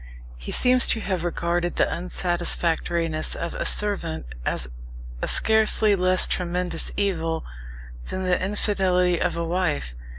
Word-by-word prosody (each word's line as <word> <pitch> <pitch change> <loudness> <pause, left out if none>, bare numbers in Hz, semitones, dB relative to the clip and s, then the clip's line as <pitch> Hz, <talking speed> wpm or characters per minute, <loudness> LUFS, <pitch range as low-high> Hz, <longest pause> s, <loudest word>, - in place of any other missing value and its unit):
He - - -6
seems 255 0 +5
to 225 - +2
have 185 -5 -2
regarded 175 0 -1
the - - +3
unsatisfactoriness 170 -2 -1
of 170 - -4
a - - -1
servant 195 - 0 0.2
as 60 - -1 0.5
a - - -1
scarcely 220 -1 +3
less 185 0 +3
tremendous 180 -1 -2
evil 165 -5 -1 0.6
than 190 - -3
the 180 0 +1
infidelity 185 -3 +1
of 175 -2 0
a 170 - -1
wife. 165 - -1
180 Hz, 130 wpm, -24 LUFS, 170-190 Hz, 0.6 s, seems